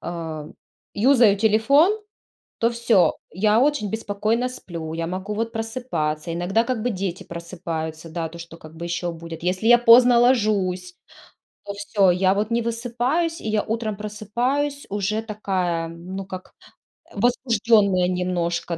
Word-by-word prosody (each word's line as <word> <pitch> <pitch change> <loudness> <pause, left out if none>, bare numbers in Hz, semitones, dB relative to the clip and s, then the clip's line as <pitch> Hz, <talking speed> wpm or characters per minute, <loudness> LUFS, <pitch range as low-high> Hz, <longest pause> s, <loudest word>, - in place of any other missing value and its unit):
а, 160 -3 -6 0.5
юзаю 235 -2 +5
телефон, 265 - +4 0.6
то 230 +1 +1
всё. 225 -8 +3 0.2
Я 210 +5 +2
очень 260 -7 +1
беспокойно 220 +3 -1
сплю, 165 -9 -7
я 165 0 -2
могу 190 +4 -4
вот 225 +1 -2
просыпаться, 225 -10 -3
иногда 185 +6 +1
как 245 -2 -2
бы 245 - 0
дети 190 -4 -4
просыпаются, 165 -2 -6
да, 165 0 -3
то 170 +1 -12
что 170 0 -10
как 155 -1 -14
бы 170 +1 -6
ещё 175 0 -2
будит. 165 0 -9
Если 185 +5 0
я 240 - +8
поздно 240 +1 +7
ложусь, 200 -7 +1 0.7
то 200 - -6
всё, 200 -1 +2
я 185 +2 +3
вот 210 +2 -1
не 235 0 0
высыпаюсь 245 +8 -1
и - - -7
я 215 -1 +1
утром 220 -1 -3
просыпаюсь 240 +8 -2
уже 205 +2 -1
такая, 185 -6 -2
ну 180 +4 -7
как 185 -1 -9 0.6
возбуждённая 220 -5 +2
немножко, 175 -2 -2
205 Hz, 145 wpm, -23 LUFS, 175-230 Hz, 0.7 s, я